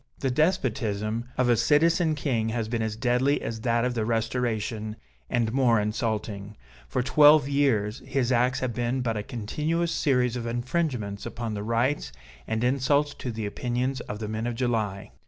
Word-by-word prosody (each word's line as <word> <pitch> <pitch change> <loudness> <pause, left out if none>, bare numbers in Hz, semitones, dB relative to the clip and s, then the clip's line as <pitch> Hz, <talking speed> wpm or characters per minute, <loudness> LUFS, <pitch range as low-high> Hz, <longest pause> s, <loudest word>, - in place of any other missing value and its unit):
The 135 - -1
despotism 115 - 0
of 130 - +2
a 120 - +5
Citizen 155 - +3
King 120 -7 -1
has 115 -1 -2
been 115 0 -2
as 110 -1 -2
deadly 125 +5 +2
as 110 -1 -5
that 115 0 +1
of 125 - 0
the 115 -2 -1
Restoration, 110 -1 -1 0.3
and 115 -2 0
more 125 -4 +4
insulting. 105 -1 -3 0.3
For 125 - -1
twelve 145 +2 +6
years 130 -6 +1
his 130 -2 0
acts 125 +1 +2
have 130 -2 -1
been 120 +2 -1
but 115 -2 -1
a 105 - -1
continuous 150 +9 -2
series 125 -4 +1
of 120 -1 -4
infringements 120 -4 -2
upon 115 -2 -4
the 100 - -3
rights, 115 - 0 0.4
and 110 +1 -1
insults 140 +3 +2
to 125 - -5
the 110 -1 -4
opinions, 125 +5 -2
of 105 - -6
the 105 0 -5
men 110 +2 -3
of 120 - -2
July. 110 -6 -1
120 Hz, 175 wpm, -26 LUFS, 110-130 Hz, 0.4 s, twelve